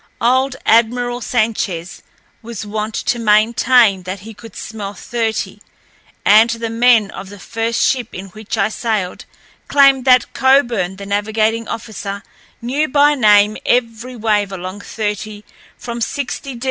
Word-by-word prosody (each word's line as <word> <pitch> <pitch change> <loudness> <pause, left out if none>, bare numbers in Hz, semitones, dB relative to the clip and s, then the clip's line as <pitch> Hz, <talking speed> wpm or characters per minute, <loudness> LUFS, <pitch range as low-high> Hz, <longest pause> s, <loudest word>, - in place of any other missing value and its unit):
Old 260 +2 +2
Admiral 245 +2 +2
Sanchez 215 -8 -2 0.4
was 230 -2 -7
wont 215 +1 -4
to 240 - -1
maintain 220 -1 +3
that 185 +1 -6
he 220 +3 -10
could 225 0 -14
smell 205 -2 -7
thirty, 225 +2 -3 0.7
and 220 +3 +6
the 230 -1 -3
men 230 -3 +3
of 195 - -9
the 205 - -11
first 225 +4 -3
ship 250 -4 0
in 195 +1 -8
which 215 +3 -6
I 200 0 +1
sailed 215 -5 -3 0.4
claimed 275 -2 +4
that 255 -2 +4
Coburn, 240 -9 +2
the 200 +1 -9
navigating 215 +2 0
officer, 200 -3 -6 0.4
knew 280 +6 0
by 290 +1 +4
name 210 -5 +4
every 240 +1 -1
wave 210 -3 0
along 185 +1 -6
thirty 210 0 -5 0.3
from 235 -1 -6
60°N. 265 0 -4
225 Hz, 135 wpm, -17 LUFS, 205-240 Hz, 0.7 s, and